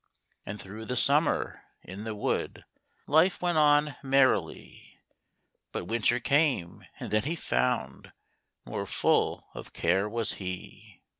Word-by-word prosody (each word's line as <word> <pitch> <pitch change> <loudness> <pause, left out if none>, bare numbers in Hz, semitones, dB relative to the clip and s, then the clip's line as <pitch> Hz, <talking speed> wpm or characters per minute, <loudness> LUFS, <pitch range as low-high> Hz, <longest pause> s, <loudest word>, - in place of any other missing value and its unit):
And 105 +1 -6
through 105 +4 -8
the 125 - -3
summer, 145 +5 +2 0.2
in 95 +4 -8
the 110 -1 -4
wood, 105 - -2 0.4
Life 160 +5 +3
went 175 -3 +1
on 150 -2 +3
merrily; 135 -1 0 0.7
But - - -4
winter 115 +4 +1
came, 140 - 0
and - - -6
then 105 0 +3
he 160 +4 -1
found 125 -6 -2 0.5
More - - -4
full - - +1
of - - -10
care 95 +5 +1
was 115 0 -1
he. 90 -1 -8
125 Hz, 130 wpm, -28 LUFS, 105-145 Hz, 0.7 s, Life